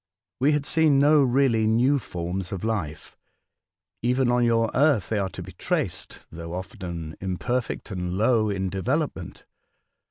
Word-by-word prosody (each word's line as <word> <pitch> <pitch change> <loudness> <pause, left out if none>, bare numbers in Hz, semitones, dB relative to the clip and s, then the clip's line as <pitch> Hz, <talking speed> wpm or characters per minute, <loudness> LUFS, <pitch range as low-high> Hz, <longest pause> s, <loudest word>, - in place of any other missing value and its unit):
We 145 +4 +3
had 145 -1 0
seen 155 -1 +3
no 145 +2 +5
really 125 -4 +3
new 125 +6 +3
forms 90 -3 -5
of 95 -1 -5
life. 95 -10 -3 0.9
Even 125 +1 +2
on 120 0 +2
your 115 -1 +2
Earth 140 - +3
they 110 - 0
are 95 -1 -1
to 90 - -8
be 95 - -10
traced, 90 - -3
though 85 +1 -7
often 85 -3 -6
imperfect 110 +6 -3
and 90 -1 -3
low 110 0 +3
in 95 -1 -1
development. 130 - -3
110 Hz, 150 wpm, -25 LUFS, 95-130 Hz, 0.9 s, no